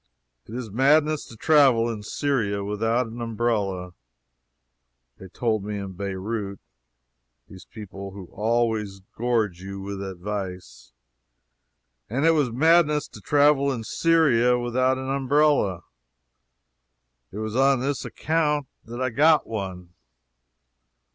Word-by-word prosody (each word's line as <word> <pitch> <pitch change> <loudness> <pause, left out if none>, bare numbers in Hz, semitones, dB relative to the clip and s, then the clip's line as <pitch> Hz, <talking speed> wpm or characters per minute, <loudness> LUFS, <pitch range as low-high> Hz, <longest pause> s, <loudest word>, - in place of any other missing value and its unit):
It 110 - -8
is 120 -4 -5
madness 150 +6 +3
to 115 - -12
travel 135 -5 +4
in 115 -3 -4
Syria 105 -4 -1
without 110 +4 0
an 115 +1 -8
umbrella. 105 -6 -2 1.3
They 95 - -10
told 110 +2 -1
me 105 0 -4
in 100 -1 -5
Beirout 100 +2 -4 0.9
(these 95 -3 -13
people 100 -2 -9
who 95 -1 -10
always 110 -2 -1
gorge 110 -7 0
you 100 +1 -7
with 100 0 -6
advice) 95 -9 -6 1.2
that 130 +6 -1
it 165 - +6
was 145 -7 +1
madness 150 +2 +3
to - - -13
travel 145 -1 +3
in 120 -4 -4
Syria 125 -4 +3
without 130 +2 +1
an 130 0 -5
umbrella. 140 - +2 1.5
It 100 - -9
was 110 0 -4
on 135 0 +4
this 140 +1 -2
account 150 -2 0 0.2
that 120 +2 -8
I 130 -1 -1
got 150 +5 +4
one. 95 -5 -6
115 Hz, 120 wpm, -24 LUFS, 100-135 Hz, 1.5 s, it